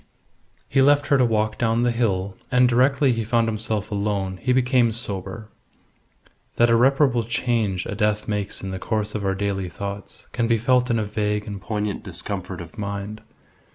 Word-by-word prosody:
He 135 - +2
left 145 +1 +4
her 140 - +5
to - - +5
walk 110 -2 0
down 115 0 +2
the 120 - +3
hill, 100 -5 -1 0.2
and 125 0 +5
directly 130 +2 +3
he 115 -1 -2
found 115 +1 +1
himself 110 -1 -2
alone 100 -2 -1
he 125 - -1
became 125 -2 +3
sober. 105 -1 -4 1.1
That 120 0 +4
irreparable 125 +1 +4
change 115 -5 -1
a - - -4
death 105 0 0
makes 105 -2 -2
in 95 - -4
the 95 - -4
course 110 0 -2
of 105 - -3
our 95 0 0
daily 95 -2 -2
thoughts 100 +2 -7
can 120 -2 0
be 115 0 +3
felt 125 +2 +2
in 115 - +2
a 110 - 0
vague 105 0 -1
and 100 -2 -6
poignant 105 -1 -3
discomfort 95 -3 -4
of 85 +6 -11
mind. 100 +1 -5
110 Hz, 180 wpm, -23 LUFS, 100-120 Hz, 1.1 s, her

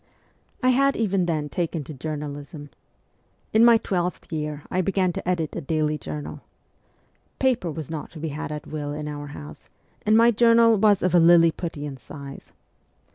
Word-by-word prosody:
I 255 - +4
had 275 +2 +3
even 195 -5 +1
then 155 -3 -1
taken 165 -1 -3
to 155 - -9
journalism. 145 0 -6 0.8
In 220 +1 +5
my 235 -1 +7
twelfth 180 -5 -3
year 150 -1 -4
I 185 - +1
began 185 -1 0
to - - -6
edit 165 -4 -1
a - - -3
daily 155 0 -1
journal. 150 -1 -7 1.0
Paper 250 -9 +1
was 160 -1 -6
not 155 -2 -5
to 160 - -9
be 160 +1 -3
had 150 +1 -5
at 150 -1 -6
will 145 -1 -5
in 150 0 -5
our 145 -1 -6
house, 75 - -11 0.3
and 215 +1 +4
my 230 +1 +6
journal 230 0 +5
was 205 -1 +3
of 185 -1 +1
a 175 - +6
Liliputian 165 -4 +3
size. 140 +3 -11
160 Hz, 170 wpm, -24 LUFS, 150-195 Hz, 1.0 s, my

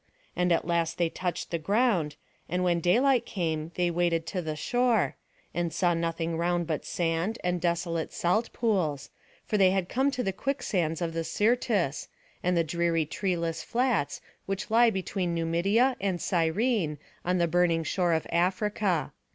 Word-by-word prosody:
And 180 0 +1
at 170 - +2
last 170 -1 0
they 170 -1 +1
touched 180 0 -4
the 170 - -1
ground, 195 -5 +1 0.3
and 180 +2 0
when 175 -1 +2
daylight 240 +9 +3
came 165 -6 -3
they 175 -1 +1
waded 170 -1 +1
to 185 - -3
the 155 -2 -4
shore; 245 +8 +1 0.4
and 175 -1 -1
saw 175 0 +2
nothing 165 0 -2
round 175 0 +1
but 155 -2 -3
sand, 170 +6 -1
and 180 -1 0
desolate 170 -1 -1
salt 215 +7 0
pools; 180 - -1 0.3
for 210 - 0
they 190 -1 +6
had 185 -1 0
come 265 +2 +2
to 255 -2 -2
the 195 - -1
quicksands 185 - -1
of 165 -1 -2
the 165 0 -2
Syrtis, 210 - +1 0.3
and 180 0 +1
the 165 - +4
dreary 165 0 0
treeless 170 -1 -2
flats, 240 - 0 0.3
which 195 +2 -3
lie 235 +1 +6
between 190 -3 -2
Numidia 195 +10 +2
and 190 -3 0
Cyrene, 175 - +1 0.3
on 180 +1 +1
the 170 -1 +2
burning 170 -1 +2
shore 175 +2 +1
of 160 - 0
Africa. 185 -2 0
175 Hz, 165 wpm, -28 LUFS, 165-200 Hz, 0.4 s, they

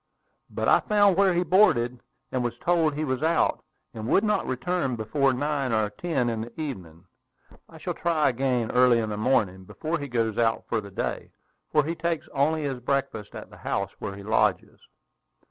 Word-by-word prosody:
"But - - -2
I - - +6
found 205 -3 +3
where 190 -1 +3
he 175 - +2
boarded; 125 - +3 0.3
and 130 -1 -1
was 120 - -3
told 165 -4 +1
he 155 - -2
was 130 -1 -2
out, 160 +1 +1 0.3
and 110 0 -6
would 195 - +3
not 210 -1 +1
return 135 +1 -1
before 135 +5 +1
nine 140 0 -1
or 110 -2 +1
ten 150 0 -1
in 115 -2 -2
the 115 +5 -9
evening. 90 - -6 0.6
I - - -13
shall - - -4
try 165 -4 +1
again 125 -2 0
early 125 -1 +5
in 110 -2 -1
the 105 - -3
morning, 105 -5 +1
before 160 - -4
he 145 - -5
goes 115 -4 -1
out 115 -1 +1
for 115 - -1
the 100 - -10
day, 95 - -4 0.4
for 150 - +4
he 160 +4 -2
takes 170 -1 -2
only 150 +3 +1
his 135 -3 -3
breakfast 125 -5 -2
at - - -9
the - - -13
house - - -2
where 100 - -5
he 100 - -10
lodges." 105 -3 0
130 Hz, 195 wpm, -26 LUFS, 115-160 Hz, 0.6 s, I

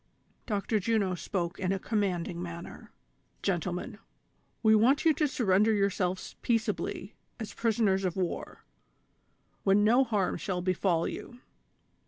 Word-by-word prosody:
Dr. 210 0 0
Juno 205 -2 +1
spoke 175 -1 -3
in 185 -1 0
a 195 - +1
commanding 185 -5 -1
manner: 170 0 -8 0.5
"Gentlemen, 180 +2 -2 0.6
we 220 -1 +6
want 255 +8 +4
you 320 - +6
to 300 +1 +1
surrender 215 -5 +3
yourselves 195 -3 -1
peaceably 220 -3 -1 0.3
as 220 -2 -6
prisoners 215 -4 +1
of 180 -3 -1
war, 185 -3 -4 1.0
when 200 +1 +4
no 240 +5 +5
harm 210 -7 0
shall 180 -2 -3
befall 185 -2 +1
you." 245 - -7
195 Hz, 125 wpm, -29 LUFS, 185-220 Hz, 1.0 s, we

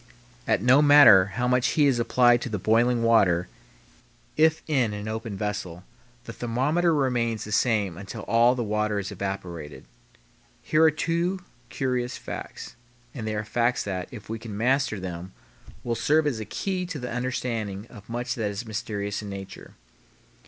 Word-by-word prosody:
And 95 - +1
no 130 +4 +6
matter 145 -10 +8
how 125 0 +1
much 125 0 +2
heat 150 - +5
is 135 -4 +2
applied 120 0 +4
to 125 - -4
the 105 - -2
boiling 115 +4 +2
water, 95 -7 +3 0.9
if 160 0 +3
in 130 -9 +1
an 105 +1 -6
open 110 -1 -5
vessel, 95 -4 -4 0.4
the 115 - -8
thermometer 140 +10 0
remains 120 -6 0
the 105 - -8
same 105 -6 +1
until 100 +3 -7
all 115 +3 +3
the 120 - -2
water 105 -1 -1
is 100 -1 -4
evaporated. 90 -6 -6 0.8
Here 155 - +2
are 160 - +7
two 170 +4 -1 0.3
curious 125 -2 -2
facts, - - -8 0.4
and 110 -5 -6
they 110 - -2
are 105 - -2
facts 120 +3 0
that, 95 -3 -4
if 110 -5 -11
we 115 +1 -5
can 110 -3 -7
master 125 -1 +1
them, 90 0 -7 0.5
will 120 - -1
serve 150 +6 +2
as 135 -7 -1
a 110 - -5
key 180 - -3
to 175 -4 -5
the 125 -2 -6
understanding 115 -5 -3
of 105 -2 -14
much 120 0 -3
that 110 -3 -2
is 100 +3 -5
mysterious 105 -2 -4
in 105 - -7
nature. 95 -1 -9
115 Hz, 170 wpm, -25 LUFS, 105-125 Hz, 0.9 s, matter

